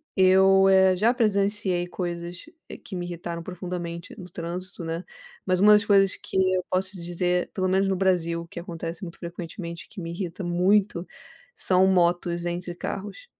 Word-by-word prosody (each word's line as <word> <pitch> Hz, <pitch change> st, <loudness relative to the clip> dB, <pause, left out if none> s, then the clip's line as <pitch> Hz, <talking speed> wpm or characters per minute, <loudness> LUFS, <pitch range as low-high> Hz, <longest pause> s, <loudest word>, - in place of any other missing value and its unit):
eu, 190 Hz, 0 st, +6 dB
eh, 190 Hz, -1 st, +5 dB
já 220 Hz, +6 st, +3 dB
presenciei 200 Hz, -5 st, +1 dB
coisas 175 Hz, -1 st, -5 dB, 0.4 s
que 195 Hz, -, -8 dB
me 175 Hz, -1 st, -3 dB
irritaram 170 Hz, -1 st, -5 dB
profundamente 175 Hz, -1 st, -6 dB
no 180 Hz, -, -8 dB
trânsito, 175 Hz, +1 st, -6 dB
né, 165 Hz, +2 st, -4 dB, 0.4 s
mas 185 Hz, -1 st, +1 dB
uma 210 Hz, +2 st, +7 dB
das 210 Hz, +1 st, +4 dB
coisas 195 Hz, -2 st, +4 dB
que -, -, -6 dB, 0.2 s
eu 185 Hz, -, 0 dB
posso 185 Hz, +1 st, 0 dB
dizer, 175 Hz, +1 st, -1 dB
pelo 185 Hz, -1 st, 0 dB
menos 190 Hz, +1 st, +2 dB
no 190 Hz, -, +1 dB
Brasil, 175 Hz, -3 st, +1 dB
o 170 Hz, -, -10 dB
que 170 Hz, -, -8 dB
acontece 170 Hz, +1 st, -6 dB
muito 170 Hz, -2 st, -8 dB
frequentemente, 170 Hz, 0 st, -7 dB
que 200 Hz, -, -8 dB
me 165 Hz, 0 st, -5 dB
irrita 180 Hz, +1 st, -5 dB
muito 180 Hz, +1 st, +2 dB, 0.5 s
são 185 Hz, 0 st, +3 dB
motos 175 Hz, -1 st, +2 dB
entre 175 Hz, 0 st, -4 dB
carros. 205 Hz, -, -6 dB
180 Hz, 165 wpm, -25 LUFS, 170-190 Hz, 0.5 s, uma